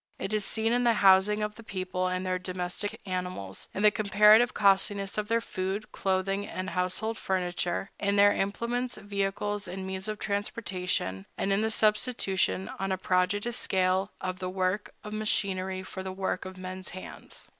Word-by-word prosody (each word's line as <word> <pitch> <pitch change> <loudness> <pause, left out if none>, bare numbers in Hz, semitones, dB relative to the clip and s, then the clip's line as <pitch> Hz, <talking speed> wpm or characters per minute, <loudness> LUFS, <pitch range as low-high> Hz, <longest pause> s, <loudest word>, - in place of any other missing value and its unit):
It 195 +2 -4
is 215 -1 +2
seen 225 +3 +1
in 245 0 +2
the 235 -1 +4
housing 195 +3 +6
of 210 0 -2
the 230 - -12
people 185 -2 -2
and 185 0 -1
of - - -5
their 185 0 0
domestic 185 +4 -4
animals, 180 - -4
in 200 - -3
the 210 - +7
comparative 210 +3 +6
costliness 200 0 +2
of 210 -1 -1
their 230 +1 +2
food, 190 +1 -3
clothing, 195 +1 0
and 185 +1 -4
household 185 +5 -1
furniture, 180 0 -1
in 200 0 +1
their 205 0 +6
implements, 235 +5 -1
vehicles, 205 0 -2
and 190 +1 -5
means 190 +1 -4
of 215 0 -3
transportation, 185 - -2
and 195 - +1
in 200 - +2
the 220 - +1
substitution, 210 - +1
on 195 0 -1
a 190 - +1
prodigious 190 +5 +1
scale, 185 +1 +1
of 185 0 -4
the 185 -1 -3
work 185 +2 -1
of 210 - -7
machinery 190 -3 -1
for 190 0 -7
the 190 0 -4
work 190 -1 -2
of 185 0 -8
men's 185 0 -6
hands. 185 - -9
195 Hz, 175 wpm, -29 LUFS, 185-210 Hz, -, the